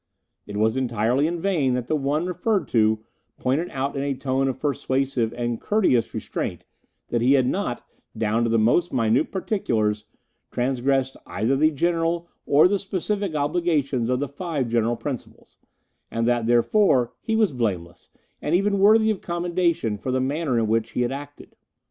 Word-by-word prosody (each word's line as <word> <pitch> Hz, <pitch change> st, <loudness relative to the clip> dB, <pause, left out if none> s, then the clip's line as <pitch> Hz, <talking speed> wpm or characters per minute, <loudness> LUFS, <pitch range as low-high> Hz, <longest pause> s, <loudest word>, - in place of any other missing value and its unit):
It 105 Hz, -, -5 dB
was 110 Hz, +3 st, +2 dB
entirely 125 Hz, +3 st, +1 dB
in 170 Hz, +1 st, -3 dB
vain 160 Hz, -9 st, +1 dB
that 125 Hz, -1 st, -2 dB
the 155 Hz, -, 0 dB
one 150 Hz, +3 st, 0 dB
referred 185 Hz, +3 st, -1 dB
to 110 Hz, -1 st, +2 dB, 0.3 s
pointed 145 Hz, +7 st, 0 dB
out 135 Hz, +2 st, -3 dB
in 135 Hz, -, -2 dB
a 140 Hz, -1 st, -1 dB
tone 135 Hz, 0 st, 0 dB
of 130 Hz, -1 st, -3 dB
persuasive 135 Hz, -4 st, 0 dB
and 120 Hz, -1 st, -3 dB
courteous 185 Hz, -, +2 dB
restraint -, -, -4 dB, 0.4 s
that 120 Hz, -, 0 dB
he 130 Hz, +3 st, +4 dB
had 130 Hz, -2 st, +4 dB
not, 130 Hz, -4 st, -2 dB, 0.3 s
down 110 Hz, +1 st, +1 dB
to 115 Hz, -, +1 dB
the 115 Hz, -, +2 dB
most 145 Hz, +11 st, +2 dB
minute 115 Hz, +3 st, +1 dB
particulars, 110 Hz, -, -1 dB, 0.4 s
transgressed 135 Hz, +1 st, 0 dB
either 120 Hz, +5 st, 0 dB
the 155 Hz, +3 st, +4 dB
general 170 Hz, +2 st, 0 dB, 0.2 s
or 145 Hz, +4 st, +6 dB
the 200 Hz, +1 st, 0 dB
specific 195 Hz, -1 st, -2 dB
obligations 145 Hz, -5 st, 0 dB
of 125 Hz, 0 st, +1 dB
the 145 Hz, -, -1 dB
Five 145 Hz, -3 st, -3 dB
General 115 Hz, 0 st, +1 dB
Principles, 130 Hz, 0 st, -8 dB, 0.5 s
and 115 Hz, 0 st, -1 dB
that, 120 Hz, -2 st, +1 dB
therefore, 125 Hz, -, +3 dB
he 225 Hz, -, -1 dB
was 220 Hz, -5 st, +3 dB
blameless, 90 Hz, -8 st, -3 dB, 0.3 s
and 155 Hz, -, +1 dB
even 200 Hz, +2 st, +1 dB
worthy 220 Hz, +2 st, +5 dB
of 205 Hz, -, -4 dB
commendation 170 Hz, -, -1 dB
for 130 Hz, -, -5 dB
the 130 Hz, -, +1 dB
manner 135 Hz, 0 st, -1 dB
in 115 Hz, -, +2 dB
which 110 Hz, 0 st, 0 dB
he -, -, 0 dB
had 120 Hz, 0 st, 0 dB
acted. 145 Hz, +1 st, -9 dB
135 Hz, 170 wpm, -24 LUFS, 120-170 Hz, 0.5 s, or